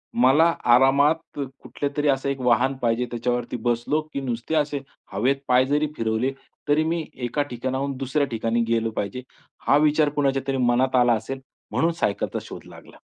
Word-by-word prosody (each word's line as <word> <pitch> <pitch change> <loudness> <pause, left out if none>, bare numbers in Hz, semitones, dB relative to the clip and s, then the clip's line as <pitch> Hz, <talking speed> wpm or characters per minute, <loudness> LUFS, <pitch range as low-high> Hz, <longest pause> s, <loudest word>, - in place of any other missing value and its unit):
मला 130 +7 +5 0.3
आरामात 140 +5 +3
कुठल्यातरी 140 +2 -3
असं 135 0 +1
एक 140 - -2
वाहन 125 +2 +2
पाहिजे. 120 +1 +1
त्याच्यावरती 120 +1 -2
बसलो, 120 +6 +1
की 140 - -2
नुसते 125 +4 -3
असे 145 -2 0 0.3
हवेत 125 +8 +2
पाय 125 +1 +4
जरी 150 +3 +1
फिरवले, 115 +3 0 0.4
तरी 150 +2 +3
मी 165 0 -1 0.2
एका 145 +5 -1
ठिकाणाहून 130 +3 -2
दुसऱ्या 140 +2 0
ठिकाणी 115 +1 0
गेलो 115 -1 0
पाहिजे. 115 +5 -3 0.5
हा 145 - +6
विचार 150 0 +3
कुणाच्यातरी 135 -1 0
मनात 125 +1 +2
आला 120 -1 +5
असेल. 115 +5 -3 0.3
म्हणून 165 +1 +2
सायकलचा 105 -11 -1
शोध - - -10
लागला. - - -15
135 Hz, 155 wpm, -24 LUFS, 120-145 Hz, 0.5 s, हा